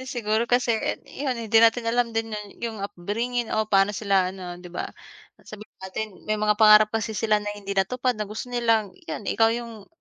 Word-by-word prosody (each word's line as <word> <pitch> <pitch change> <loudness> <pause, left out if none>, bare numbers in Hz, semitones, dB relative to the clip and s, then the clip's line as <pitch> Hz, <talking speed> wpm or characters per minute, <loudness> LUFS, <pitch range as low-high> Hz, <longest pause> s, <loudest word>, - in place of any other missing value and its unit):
Eh, 260 - -9
siguro 220 -2 0
kasi 245 -1 +3 0.3
'yon, 265 -3 -3
hindi 225 -1 +3
natin 230 +1 +4
alam 235 +1 +1
din 225 -1 -2
'yon 210 0 -5 0.2
yung 225 -1 -6
upbringing 220 +6 -3
o 220 - +2
pa'no 195 +1 +3
sila 195 -3 +2
ano, 180 -2 -8
'di 180 - -12
ba. 180 0 -5 0.6
Sabihin 215 0 -11
natin 190 +3 -4 0.2
may 215 - +1
mga 210 0 +1
pangarap 215 -1 +7
kasi 220 0 -2
sila 215 0 +2
na 210 - -9
hindi 200 -1 -9
natupad 250 +4 0
na 210 - -2
gusto 215 +4 -7
nilang, 230 -4 +1 0.2
'yan 160 - -5
ikaw 225 +2 +2
yung 230 -3 -7
215 Hz, 200 wpm, -25 LUFS, 205-230 Hz, 0.6 s, pangarap